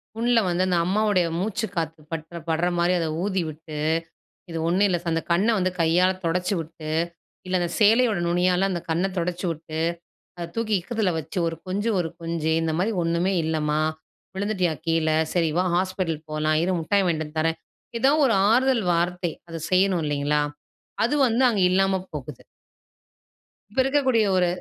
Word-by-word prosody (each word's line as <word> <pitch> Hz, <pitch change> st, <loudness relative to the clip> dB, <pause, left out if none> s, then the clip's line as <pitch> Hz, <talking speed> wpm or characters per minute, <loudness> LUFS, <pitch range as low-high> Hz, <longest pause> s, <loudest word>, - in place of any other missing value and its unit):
புண்ல 235 Hz, +1 st, +3 dB
வந்து, 175 Hz, +1 st, +1 dB
அந்த 180 Hz, -1 st, +2 dB
அம்மாவுடைய 195 Hz, -2 st, +2 dB
மூச்சு 210 Hz, +3 st, -1 dB
காத்து 165 Hz, -2 st, -3 dB
பட்ற 165 Hz, +1 st, -5 dB
படுற 165 Hz, +2 st, +1 dB
மாரி, 175 Hz, +1 st, +2 dB
அத 165 Hz, -, -1 dB, 0.2 s
ஊதிவிட்டு, 165 Hz, -5 st, -3 dB, 0.7 s
இது 165 Hz, -, -4 dB
ஒண்ணும் 185 Hz, +4 st, +3 dB
இல்ல 180 Hz, -, +1 dB
சா 175 Hz, -, -9 dB
அந்த 165 Hz, -, 0 dB
கண்ண 180 Hz, +6 st, +3 dB
வந்து 185 Hz, -1 st, +1 dB
கையால 175 Hz, +3 st, +4 dB
தொடச்சி 180 Hz, +4 st, 0 dB
விட்டு, 160 Hz, -1 st, -7 dB, 0.6 s
இல்ல 185 Hz, 0 st, 0 dB
அந்த 175 Hz, -1 st, -1 dB
சேலையோட 220 Hz, -1 st, +4 dB
நுனியால 180 Hz, +2 st, +2 dB
அந்த 175 Hz, -2 st, -2 dB
கண்ண 165 Hz, +3 st, +1 dB
தொடைச்சி 175 Hz, +1 st, -2 dB
விட்டு, 160 Hz, 0 st, -6 dB, 0.6 s
அத 170 Hz, -, -5 dB
தூக்கி 220 Hz, -2 st, 0 dB
இக்கத்துல 210 Hz, -1 st, -1 dB
வச்சு 160 Hz, +3 st, -5 dB
ஒரு 165 Hz, -, -5 dB
கொஞ்சு 205 Hz, +5 st, -1 dB
ஒரு 170 Hz, -, 0 dB
கொஞ்சு, 165 Hz, -1 st, -1 dB
இந்த 160 Hz, -, 0 dB
மாரி 200 Hz, +5 st, +1 dB
"ஒண்ணுமே 170 Hz, +3 st, +1 dB
இல்லம்மா! 155 Hz, -1 st, 0 dB, 0.6 s
விழுந்துட்டியா 195 Hz, -4 st, 0 dB
கீழ? 165 Hz, -1 st, +1 dB, 0.2 s
சரி 170 Hz, -3 st, +1 dB
வா 180 Hz, -, +2 dB
ஹாஸ்பிட்டல் 180 Hz, -4 st, -1 dB
போலாம், 155 Hz, 0 st, +1 dB
இரு 185 Hz, -, +1 dB
முட்டாய் 195 Hz, +5 st, +2 dB
வாங்கிட்டு 160 Hz, -2 st, 0 dB
வந்து 150 Hz, +1 st, -8 dB
தர்றேன்", 165 Hz, +1 st, 0 dB, 0.4 s
எதோ 270 Hz, +4 st, +4 dB
ஒரு 235 Hz, -, +2 dB, 0.2 s
ஆறுதல் 255 Hz, -2 st, +3 dB
வார்த்தை. 175 Hz, 0 st, 0 dB, 0.2 s
அதை 165 Hz, -1 st, -6 dB
செய்யணும் 185 Hz, -2 st, +3 dB
இல்லைங்களா? 145 Hz, 0 st, +1 dB, 0.7 s
அது 245 Hz, -, 0 dB
வந்து 235 Hz, +3 st, +2 dB
அங்க 205 Hz, -4 st, 0 dB
இல்லாம 190 Hz, 0 st, +2 dB
போகுது. 145 Hz, -4 st, -7 dB, 1.3 s
இப்ப 235 Hz, -, 0 dB
இருக்கக்கூடிய 265 Hz, -5 st, +2 dB
ஒரு 180 Hz, -, +3 dB
180 Hz, 165 wpm, -24 LUFS, 165-195 Hz, 1.3 s, கையால